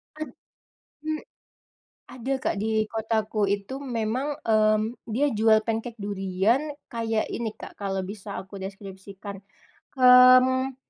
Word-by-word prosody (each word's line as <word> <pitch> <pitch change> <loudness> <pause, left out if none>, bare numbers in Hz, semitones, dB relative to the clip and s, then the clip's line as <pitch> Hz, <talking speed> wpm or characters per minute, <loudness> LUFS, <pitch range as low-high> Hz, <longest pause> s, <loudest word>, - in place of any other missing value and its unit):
He 310 - -4 0.8
hmm. 310 0 -2 0.9
Ada 255 +2 -3
Kak. - - 0
Di 220 0 +1
kotaku 220 -1 -1
itu 200 +5 -2
memang, 250 +3 -2
mmm, 215 +1 +2
dia 255 +7 +1
jual 220 0 +4
pancake 225 +1 -3
durian. 195 +4 +1 0.3
Kayak 225 -2 -1
ini 235 -1 -2
Kak, - - -9
kalau 195 -1 -2
bisa 200 +1 -8
aku 195 +1 -10
deskripsikan. 195 0 -8 0.6
Mmm, 255 +1 +6
220 Hz, 115 wpm, -26 LUFS, 200-250 Hz, 0.9 s, Mmm